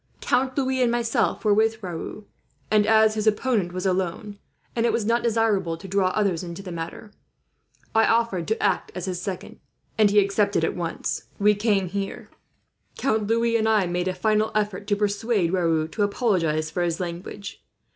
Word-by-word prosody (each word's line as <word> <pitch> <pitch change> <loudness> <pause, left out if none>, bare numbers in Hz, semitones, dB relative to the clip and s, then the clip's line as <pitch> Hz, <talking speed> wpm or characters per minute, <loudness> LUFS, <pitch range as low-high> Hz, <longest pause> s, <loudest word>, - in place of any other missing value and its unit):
Count 260 +1 0
Louis 260 -1 +1
and 240 -2 +3
myself 235 -1 0
were 210 - +5
with 220 +1 +1
Raoul, 180 +4 -6 0.5
and 210 -1 +4
as 220 -1 +5
his 215 0 -2
opponent 215 -4 +1
was 185 +1 -4
alone, 190 +3 -2 0.4
and 235 0 +2
it - - +2
was 230 - -1
not 235 +2 +2
desirable 215 -7 +1
to 195 - -10
draw 195 0 +2
others 185 -3 0
into 175 +1 -7
the 185 - -7
matter, 170 +5 -7 0.8
I 225 0 +4
offered 225 -7 +1
to 220 - -1
act - - 0
as 180 -1 -4
his 180 -2 -3
second; 190 -2 -6 0.4
and 210 -1 +6
he 205 - +1
accepted 200 -2 +2
it, - - +3
at - - -11
once. 170 -2 -3
We 210 +1 +4
came 205 -2 +1
here. 195 +2 -5 0.7
Count 220 -6 0
Louis 230 +1 +2
and 220 -1 +2
I 215 -3 +3
made 175 +1 -2
a 185 - -1
final 215 +3 +1
effort 205 -2 -1
to 205 - +2
persuade 205 -3 0
Raoul 165 -4 +1
to 210 - -4
apologize 180 -8 +1
for 180 - -2
his 170 -1 -1
language. 180 +3 -6
205 Hz, 185 wpm, -24 LUFS, 180-220 Hz, 0.8 s, and